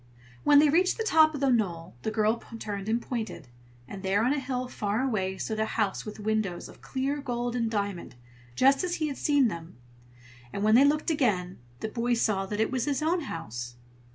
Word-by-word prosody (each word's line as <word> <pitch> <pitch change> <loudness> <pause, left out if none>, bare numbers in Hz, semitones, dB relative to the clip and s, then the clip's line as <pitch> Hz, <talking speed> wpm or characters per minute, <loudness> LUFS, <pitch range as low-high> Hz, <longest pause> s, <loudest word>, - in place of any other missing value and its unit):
When 290 - +6
they 300 +1 +7
reached 360 +5 +3
the 450 - -1
top 315 -7 +5
of 285 - -5
the 275 -1 +3
knoll, 175 -8 -1
the - - -2
girl 220 +1 +1 0.2
turned 205 -2 -5
and 230 +2 +2
pointed; 220 - -5 0.4
and 195 +4 -8
there 195 +2 +1
on 260 - +3
a 295 - 0
hill 255 -1 -3
far 210 0 -1
away 190 -7 -1
stood 220 +2 -3
a 220 - +2
house 210 -1 0
with 215 - -7
windows 215 -4 -1
of - - -15
clear 275 +2 -2
gold 245 -2 -2
and 230 -2 0
diamond, 200 - -3 0.4
just 270 +3 +4
as 355 -1 -1
he 310 -2 -1
had 275 - -5
seen 285 -4 +3
them. 170 - -7 0.8
And 200 - -3
when 215 +1 +4
they 260 +5 +7
looked 300 +3 +2
again, 195 - 0 0.2
the - - -2
boy 240 +2 0
saw 200 -4 0
that 210 +1 -4
it 220 - +1
was 255 -3 -1
his 290 +1 -1
own 340 +3 +1
home. 110 - -6
230 Hz, 210 wpm, -28 LUFS, 205-275 Hz, 0.8 s, they